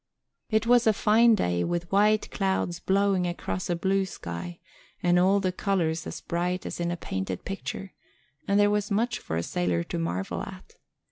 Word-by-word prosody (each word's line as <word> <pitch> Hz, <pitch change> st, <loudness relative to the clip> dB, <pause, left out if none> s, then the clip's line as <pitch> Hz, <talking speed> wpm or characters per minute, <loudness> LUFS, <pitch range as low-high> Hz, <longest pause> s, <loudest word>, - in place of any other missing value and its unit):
It 220 Hz, 0 st, +2 dB
was 240 Hz, -1 st, +4 dB
a 220 Hz, -, +6 dB
fine 225 Hz, +3 st, +5 dB
day, 90 Hz, -, 0 dB
with 175 Hz, 0 st, -2 dB
white 210 Hz, +2 st, +3 dB
clouds 190 Hz, -3 st, -1 dB
blowing 190 Hz, -1 st, +2 dB
across 95 Hz, -, -4 dB
a 175 Hz, -, +1 dB
blue 190 Hz, +2 st, +1 dB
sky 85 Hz, -, -6 dB, 0.5 s
and 175 Hz, 0 st, +4 dB
all 190 Hz, +3 st, +4 dB
the 185 Hz, -2 st, 0 dB
colors 170 Hz, -4 st, -1 dB
as 160 Hz, -, -6 dB
bright 175 Hz, +2 st, -2 dB
as -, -, -5 dB
in 170 Hz, 0 st, 0 dB
a 175 Hz, -, -2 dB
painted 95 Hz, -, -4 dB
picture, 195 Hz, 0 st, -5 dB, 0.5 s
and 200 Hz, 0 st, +3 dB
there 205 Hz, 0 st, +5 dB
was 210 Hz, -1 st, 0 dB
much 230 Hz, +4 st, 0 dB
for 80 Hz, -, -5 dB
a 85 Hz, -, -1 dB
sailor 90 Hz, -1 st, 0 dB
to -, -, -4 dB
marvel 85 Hz, +3 st, -2 dB
at. -, -, -9 dB
180 Hz, 185 wpm, -27 LUFS, 160-200 Hz, 0.5 s, a